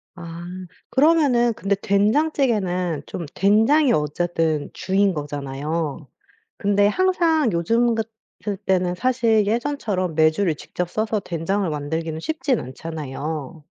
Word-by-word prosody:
아 170 -1 -8 0.5
그러면은 270 -6 +4
근데 200 -1 0
된장찌개는 205 - +1
좀 170 - -5
된장이 230 +7 +4
어쨌든 155 0 0
주인 195 +1 +1
거잖아요. 145 +1 -4 0.5
근데 205 0 +3
항상 330 - +2
요즘 230 +8 +2
같을 220 -2 -6
때는 185 -2 0
사실 230 -2 +2
예전처럼 215 - -1
메주를 160 +2 +3
직접 180 +3 -5
쒀서 215 +1 -1
된장을 180 +4 -1
만들기는 160 +2 -3
쉽진 265 - -1
않잖아요. 150 +2 -6
195 Hz, 265 characters per minute, -22 LUFS, 160-230 Hz, 0.5 s, 그러면은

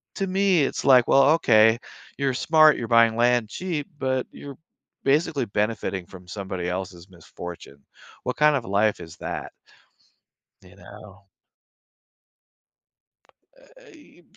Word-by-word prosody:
To 195 - -2
me, 190 -3 +2
it's 135 - -3
like, 125 -3 +5
"Well, 135 0 +5
okay. 110 -7 +4 0.4
You're 140 -1 -1
smart, 155 +3 +4
you're 115 - -5
buying 115 -1 +4
land 120 -2 +1
cheap, 165 -3 -4
but 130 -2 -2
you're 140 -2 -11 0.5
basically 140 -1 +1
benefiting 105 -3 -3
from 90 0 -14
somebody 95 -2 -5
else's 90 0 -6
misfortune." 85 -4 -11 0.4
What - - -4
kind 150 0 +4
of 130 -5 -3
life 105 +1 0
is 80 0 -11
that? - - -6 1.1
You - - -18
know? 100 +1 -15 2.3
Uh - - -21
e 320 - -17 0.2
e - - -25
120 Hz, 130 wpm, -23 LUFS, 100-150 Hz, 2.3 s, like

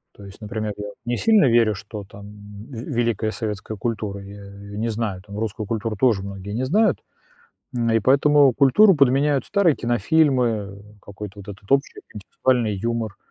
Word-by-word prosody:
То 100 - -13
есть, 100 +2 -13
например, 105 0 -4
я 105 0 -6 0.2
не 120 0 -1
сильно 220 -7 +4
верю, 115 -3 +3
что 105 +1 -8
там 100 +1 -13 0.4
в 140 - -12
великая 115 -3 -1
советская 105 0 -5
культура, 105 -2 -3
я 100 +1 -11
её 100 +1 -11
не 115 +2 -1
знаю, 110 -4 -3
там 100 +1 -10
русскую 110 -1 -4
культуру 110 -1 -3
тоже 105 -3 +2
многие 100 +1 -7
не 125 +3 -1
знают, 200 +4 +2 0.8
м, 115 -1 0
и 115 - +3
поэтому 140 +2 +4
культуру 180 +9 +5
подменяют 140 0 +2
старые 190 -7 +2
кинофильмы, 120 - +1 0.2
какой-то 100 0 -9
вот 100 - -14
этот 100 0 -11
общий, 140 +1 +1
интеллектуальный 110 +1 0
юмор. 115 0 -3
110 Hz, 165 wpm, -22 LUFS, 100-130 Hz, 0.8 s, культуру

